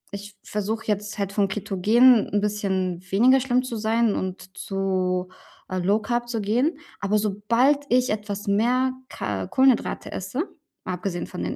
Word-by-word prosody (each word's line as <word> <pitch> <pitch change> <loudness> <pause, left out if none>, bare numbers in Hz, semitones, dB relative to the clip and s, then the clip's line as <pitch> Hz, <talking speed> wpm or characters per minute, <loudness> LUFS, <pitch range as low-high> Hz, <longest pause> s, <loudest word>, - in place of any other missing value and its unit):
ich 205 +1 -9
versuche 215 +2 -3
jetzt 205 0 -2
halt, 200 -1 -1
von 200 -1 +2
ketogen 210 +5 +4
'n 205 - +1
bisschen 190 -4 -1
weniger 250 +7 +5
schlimm 255 -1 +1
zu 240 -3 -5
sein 220 0 +2
und 185 0 -5
zu, 185 -2 -1 0.4
äh, 185 - -1
Low 200 +4 +2
Carb 240 0 -2
zu 230 - -2
gehen, 245 +11 +1 0.2
aber 205 +1 +1
sobald 230 +8 +2
ich 250 +1 +3
etwas 205 -1 -4
mehr 245 +6 +2 0.2
Ka 95 -2 -4
Kohlenhydrate 260 -2 +2
esse, 205 - -3 0.4
mal 185 - -2
abgesehen 180 0 -3
von - - -7
den 90 - -3
210 Hz, 160 wpm, -24 LUFS, 195-240 Hz, 0.4 s, weniger